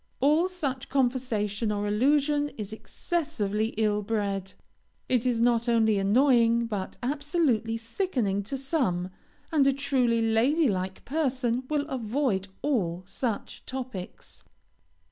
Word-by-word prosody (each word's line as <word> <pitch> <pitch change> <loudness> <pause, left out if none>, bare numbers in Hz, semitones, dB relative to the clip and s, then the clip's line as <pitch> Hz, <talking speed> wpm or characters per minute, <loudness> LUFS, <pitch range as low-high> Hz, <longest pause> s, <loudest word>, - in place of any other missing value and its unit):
All 300 +6 +4
such 285 -9 -3
conversation 240 -5 0
or 205 0 -1
allusion 290 +6 +2
is 210 -1 -5
excessively 220 - -2
ill 210 -1 +2
bred. 200 -3 -2 0.5
It 250 -1 +1
is 240 -2 +1
not 235 0 +2
only 220 -3 +3
annoying, 235 +2 +4
but 205 -4 -4
absolutely 280 -5 0
sickening 230 - -1
to 270 +6 -3
some, 250 - -1 0.4
and 290 -4 +4
a - - +6
truly 255 -4 +1
lady 250 +8 +3
like 185 -3 -3
person 260 -4 0
will 295 -2 0
avoid 235 -6 -1 0.2
all 185 - 0
such 220 +2 -4
topics. 255 -8 -6
235 Hz, 120 wpm, -27 LUFS, 210-275 Hz, 0.5 s, a